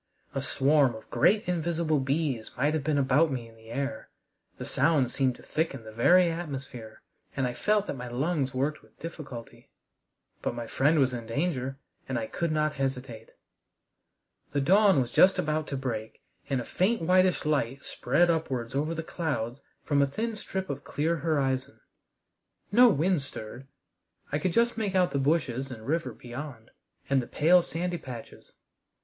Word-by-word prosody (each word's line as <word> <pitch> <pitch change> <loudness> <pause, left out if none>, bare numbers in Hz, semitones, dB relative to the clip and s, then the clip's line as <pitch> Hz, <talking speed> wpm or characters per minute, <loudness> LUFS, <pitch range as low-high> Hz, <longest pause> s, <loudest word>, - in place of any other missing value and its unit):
A 135 - -1
swarm 140 -2 +3
of 110 - -11
great 210 -1 +3
invisible 165 -3 0
bees 135 -4 -1
might 145 +4 +2
have 155 -3 -1
been 150 0 +1
about 140 +3 +3
me 120 -3 -4
in 115 - -17
the 110 0 -16
air. 140 +3 -4 0.5
The - - -6
sound 140 -7 +2
seemed 130 -3 +1
to - - -16
thicken 155 -6 -2
the 110 - -9
very 175 +10 +5
atmosphere, 135 -9 -7 0.3
and 135 - +1
I 125 - -1
felt 210 +7 +1
that - - -4
my 125 -1 -6
lungs 135 +2 -1
worked 140 +4 -1
with - - -25
difficulty. 145 -8 -9 0.7
But - - -2
my 120 -1 -4
friend 145 +7 +2
was 135 -3 +3
in 115 -2 -5
danger, 135 0 -1 0.3
and 130 - -1
I 115 - -2
could 170 +7 -2
not 155 0 +1
hesitate. 130 -4 -4 1.2
The 145 - +2
dawn 195 +3 +5
was 120 - -3
just 190 +1 +6
about 155 -3 -1
to 140 - -3
break, 115 -5 -5 0.3
and 135 -2 +1
a 120 - -5
faint 205 +2 +1
whitish 185 0 +3
light 140 -3 0
spread 170 +7 +2
upwards 130 -8 -2
over 155 +4 -1
the 165 - -3
clouds 140 -7 -3 0.2
from 145 -1 +2
a 140 - +4
thin 220 +10 -3
strip 190 -2 -4
of 140 -2 -5
clear 165 +3 -1
horizon. 135 -4 -1 0.9
No 245 +4 +7
wind 175 -2 +2
stirred. 130 -1 -8 0.6
I 150 - 0
could 185 +1 0
just 235 +1 +2
make 200 -3 -1
out 180 -1 +3
the 140 - 0
bushes 135 -3 0
and 110 -4 -9
river 165 +4 -1
beyond, 120 -1 -9 0.4
and 135 -1 +3
the 120 - -8
pale 175 +4 +5
sandy 175 +1 -3
patches. 120 -6 -10
140 Hz, 175 wpm, -28 LUFS, 130-165 Hz, 1.2 s, No